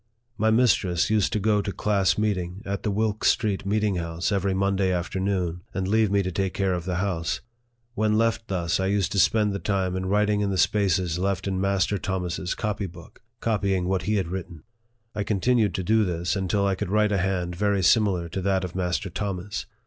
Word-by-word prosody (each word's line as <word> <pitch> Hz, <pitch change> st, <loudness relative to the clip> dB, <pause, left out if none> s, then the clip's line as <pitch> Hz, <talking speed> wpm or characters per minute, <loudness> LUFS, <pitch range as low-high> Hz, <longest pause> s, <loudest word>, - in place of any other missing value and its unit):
My 110 Hz, +1 st, +2 dB
mistress 110 Hz, -6 st, +2 dB
used 110 Hz, -3 st, +2 dB
to 110 Hz, -, +1 dB
go 105 Hz, 0 st, +2 dB
to 100 Hz, -, -3 dB
class 100 Hz, -2 st, +1 dB
meeting 100 Hz, -2 st, -2 dB
at 100 Hz, 0 st, -3 dB
the 110 Hz, -, -1 dB
Wilk 105 Hz, +1 st, -1 dB
Street 100 Hz, -3 st, +1 dB
meeting 105 Hz, -2 st, +1 dB
house 85 Hz, +2 st, -2 dB
every 100 Hz, -1 st, 0 dB
Monday 95 Hz, -1 st, +1 dB
afternoon, 90 Hz, -1 st, -1 dB
and 95 Hz, -2 st, -1 dB
leave 110 Hz, +1 st, +3 dB
me 100 Hz, 0 st, +2 dB
to 95 Hz, -, -3 dB
take 95 Hz, 0 st, -2 dB
care 95 Hz, -2 st, +1 dB
of 85 Hz, -1 st, -3 dB
the 90 Hz, -1 st, -2 dB
house. 90 Hz, -2 st, -1 dB, 0.5 s
When 110 Hz, -2 st, +1 dB
left 115 Hz, 0 st, +1 dB
thus, 85 Hz, -4 st, -1 dB
I 95 Hz, -, 0 dB
used 100 Hz, 0 st, +1 dB
to 100 Hz, -, +1 dB
spend 105 Hz, 0 st, +3 dB
the 100 Hz, -, -3 dB
time 95 Hz, -3 st, -1 dB
in 95 Hz, 0 st, -2 dB
writing 105 Hz, +1 st, +2 dB
in 100 Hz, -, 0 dB
the 95 Hz, -, -1 dB
spaces 90 Hz, -4 st, +1 dB
left 100 Hz, 0 st, -1 dB
in 95 Hz, -1 st, -1 dB
Master 100 Hz, 0 st, +1 dB
Thomas's 90 Hz, -1 st, -3 dB
copy 105 Hz, -3 st, -2 dB
book, 85 Hz, -2 st, -14 dB, 0.2 s
copying 100 Hz, -5 st, 0 dB
what 95 Hz, -1 st, 0 dB
he 105 Hz, +4 st, 0 dB
had 95 Hz, -5 st, -1 dB
written. 90 Hz, -3 st, -6 dB, 0.5 s
I 105 Hz, -, -3 dB
continued 105 Hz, +2 st, +1 dB
to 95 Hz, -, -2 dB
do 110 Hz, +4 st, +3 dB
this 85 Hz, 0 st, -1 dB
until 100 Hz, +1 st, 0 dB
I 100 Hz, -, +2 dB
could 95 Hz, 0 st, -3 dB
write 105 Hz, +1 st, +2 dB
a 100 Hz, -, +1 dB
hand 90 Hz, -2 st, -1 dB
very 100 Hz, 0 st, +1 dB
similar 95 Hz, -4 st, +3 dB
to 95 Hz, -, -4 dB
that 95 Hz, 0 st, +1 dB
of 90 Hz, -1 st, -5 dB
Master 90 Hz, 0 st, -2 dB
Thomas. 100 Hz, +1 st, -4 dB
95 Hz, 210 wpm, -25 LUFS, 90-105 Hz, 0.5 s, leave